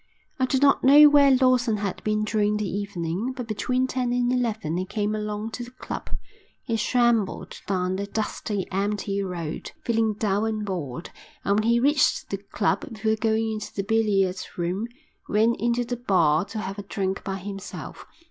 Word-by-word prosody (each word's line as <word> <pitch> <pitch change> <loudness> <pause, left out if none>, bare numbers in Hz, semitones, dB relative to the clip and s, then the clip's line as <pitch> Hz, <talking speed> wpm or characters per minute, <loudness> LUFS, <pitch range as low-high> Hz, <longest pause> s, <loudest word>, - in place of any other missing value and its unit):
I 260 - +2
do 265 - +1
not 275 +1 +4
know 290 +3 +9
where 285 -1 +6
Lawson 250 -4 +3
had 200 -2 -4
been 215 0 0
during 210 0 +1
the 210 -1 -2
evening, 195 +3 -3
but 250 -3 -5
between 250 +4 0
ten 255 -1 -1
and 245 0 +1
eleven 220 -10 -1
he 185 - 0
came 210 +2 -2
along 210 +1 -3
to 245 - -5
the 240 - -9
club. 255 - -7 0.5
He 230 - -1
shambled 235 -3 +1
down 185 -1 0
the 200 +1 -3
dusty, 205 -2 -3
empty 200 +1 -1
road, 175 -5 -5
feeling 225 -2 +1
dull 205 0 0
and 215 -1 -2
bored, 170 -6 -5 0.3
and 200 +1 +2
when 220 +2 +1
he 235 0 +4
reached 295 - +2
the - - -1
club, - - -1
before 220 0 0
going 220 0 0
into 215 -1 -6
the 195 - -1
billiard 200 -3 +2 0.2
room, 180 +6 -1 0.4
went 220 +3 +3
into 240 +1 +1
the 245 +1 -3
bar 180 -8 +2
to 220 - -8
have 195 -1 -4
a - - -2
drink 195 -1 -3
by 195 -1 -3
himself. 195 +1 -8
215 Hz, 180 wpm, -25 LUFS, 195-235 Hz, 0.5 s, know